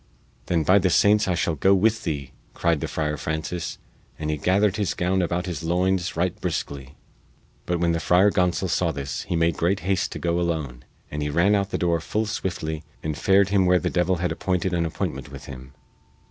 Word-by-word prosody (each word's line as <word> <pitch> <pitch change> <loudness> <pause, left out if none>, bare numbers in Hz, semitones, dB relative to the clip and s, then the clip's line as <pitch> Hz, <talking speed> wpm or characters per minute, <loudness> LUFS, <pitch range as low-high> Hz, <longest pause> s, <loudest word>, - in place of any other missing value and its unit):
"Then 85 -3 +1
by 95 +6 +5
the 95 - +2
saints 105 +3 +4
I 90 - +1
shall 85 - 0
go 95 +6 +3
with 110 +3 +1
thee!" 70 -5 -3 0.2
cried 85 -3 +1
the - - -3
Friar 75 -1 -2
Francis, 80 +3 -4 0.4
and 75 0 -2
he 75 - -1
gathered 100 +5 +2
his 100 -8 -1
gown 90 +1 +1
about 90 +1 -1
his 85 -4 -4
loins 90 +2 0
right 90 +1 0
briskly. 70 -5 -4 0.7
But 90 -1 0
when 85 0 +2
the 85 - 0
Friar 90 +6 +4
Gonsol 90 0 +1
saw 85 -1 +1
this 70 -2 -4
he - - 0
made 85 -1 +1
great 90 +2 +1
haste 95 +1 0
to - - -5
go 85 0 0
alone, 75 -8 -3 0.3
and 75 - -3
he 75 - -1
ran 85 +7 +3
out 100 -1 +2
of - - -28
the - - -2
door 85 -2 +1
full 110 +7 -2
swiftly 80 -6 -3 0.2
and 80 -1 -2
fared 95 +6 +3
him 95 -2 +3
where 90 0 +5
the 90 0 -1
devil 90 +1 +2
had 90 +1 -1
appointed 95 0 -1
an 85 -1 +1
appointment 80 - -4
with - - -9
him. 65 -1 -10
85 Hz, 215 wpm, -24 LUFS, 80-95 Hz, 0.7 s, by